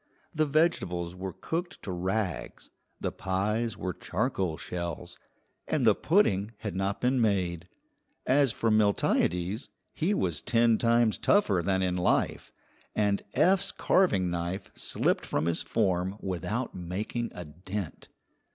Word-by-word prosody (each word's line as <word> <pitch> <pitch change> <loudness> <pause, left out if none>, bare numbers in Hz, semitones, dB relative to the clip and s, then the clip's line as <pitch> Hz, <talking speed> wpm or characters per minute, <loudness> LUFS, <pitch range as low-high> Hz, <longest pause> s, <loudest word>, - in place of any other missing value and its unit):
The 155 -1 +1
vegetables 95 - +1
were 95 +1 -5
cooked 175 - -4
to 100 - -4
rags, 95 -1 -3 0.3
the - - -2
pies 100 +3 -1
were 90 -1 -3
charcoal 85 -2 -2
shells, 85 0 -5 0.5
and 140 -6 +1
the 110 - +7
pudding 110 - +2
had 105 -4 -5
not 95 +1 -1
been 125 0 +2
made. 90 -5 0 0.6
As 135 -1 +4
for 115 0 0
Miltiades, 100 - +1 0.2
he 185 +6 0
was 85 - -1
ten 115 -2 +3
times 115 -3 +3
tougher 105 - +3
than 95 +1 +1
in 90 -1 0
life, 90 - +1 0.4
and 100 -1 +1
Eph's 195 +1 +4
carving 100 - +2
knife 85 +2 -3
slipped - - 0
from 75 - -1
his 85 -1 +1
form 95 -2 0
without 100 +7 -3
making 100 +7 -4
a 90 - -6
dent. 90 +4 -6
100 Hz, 135 wpm, -29 LUFS, 90-115 Hz, 0.6 s, the